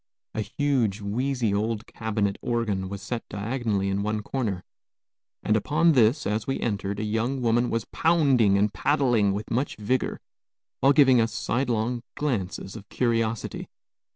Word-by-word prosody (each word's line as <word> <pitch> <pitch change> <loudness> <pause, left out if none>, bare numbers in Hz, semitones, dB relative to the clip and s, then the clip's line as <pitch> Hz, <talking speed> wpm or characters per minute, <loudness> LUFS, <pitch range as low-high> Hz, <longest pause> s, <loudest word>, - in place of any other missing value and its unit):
A 110 - -2
huge, 115 -2 0
wheezy 115 +2 -1
old 110 +1 -1
cabinet 105 -3 -2
organ 105 -6 -1
was 100 0 -7
set 120 -2 -4
diagonally 105 -2 -1
in 95 +1 0
one 105 +1 -2
corner, 105 -8 -2 0.8
and 105 - +2
upon 155 +10 +3
this, 125 0 +3
as 105 +1 -1
we 135 - -1
entered, 100 -2 -2
a - - -2
young 115 +5 -1
woman 120 0 +2
was 115 -2 -1
pounding 135 -11 +3
and 105 +1 +1
paddling 120 -9 +2
with 105 +2 -4
much 130 +5 -1
vigor, 120 +5 -1 0.6
while 135 - +5
giving 135 -4 +6
us 115 0 0
sidelong 120 +1 -1
glances 100 -8 -3
of 105 -2 -11
curiosity. 115 -2 -1
115 Hz, 150 wpm, -26 LUFS, 105-125 Hz, 0.8 s, giving